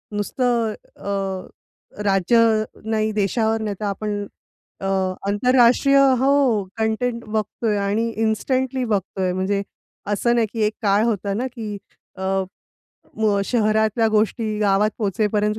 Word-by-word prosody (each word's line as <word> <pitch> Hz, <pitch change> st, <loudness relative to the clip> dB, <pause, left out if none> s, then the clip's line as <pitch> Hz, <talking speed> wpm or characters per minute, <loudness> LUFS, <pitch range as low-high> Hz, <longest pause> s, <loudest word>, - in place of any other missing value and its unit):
नुसतं 230 Hz, +1 st, 0 dB, 0.2 s
अ, 195 Hz, -2 st, -3 dB, 0.6 s
राज्य 195 Hz, +3 st, +2 dB, 0.5 s
नाही 220 Hz, 0 st, 0 dB
देशावर 220 Hz, +2 st, 0 dB
नाही, 210 Hz, -2 st, -3 dB
तर 215 Hz, -, -3 dB
आपण 205 Hz, +1 st, -3 dB, 0.5 s
अ, -, -, -6 dB, 0.4 s
आंतरराष्ट्रीय 250 Hz, +5 st, +4 dB, 0.2 s
हो. 265 Hz, -5 st, +3 dB
कंटेंट 230 Hz, +2 st, -1 dB
बघतोय 215 Hz, 0 st, -1 dB
आणि 205 Hz, +3 st, 0 dB
इन्स्टंटली 255 Hz, +4 st, 0 dB
बघतोय. 195 Hz, -3 st, -1 dB
म्हणजे 190 Hz, +2 st, 0 dB, 0.5 s
असं 235 Hz, +4 st, +1 dB
नाही 230 Hz, -2 st, +2 dB
की 225 Hz, -, -2 dB
एक 210 Hz, -, 0 dB
काळ 205 Hz, +1 st, +3 dB
होता 205 Hz, -3 st, -1 dB
ना 245 Hz, +6 st, -1 dB
की 215 Hz, -3 st, -5 dB, 0.4 s
अ, 190 Hz, -, -5 dB, 0.9 s
मग 210 Hz, -2 st, +2 dB
शहरातल्या 220 Hz, 0 st, +2 dB
गोष्टी 215 Hz, 0 st, 0 dB
गावात 205 Hz, 0 st, +2 dB
पोहोचेपर्यंत 210 Hz, +1 st, 0 dB
215 Hz, 120 wpm, -22 LUFS, 205-230 Hz, 0.9 s, आंतरराष्ट्रीय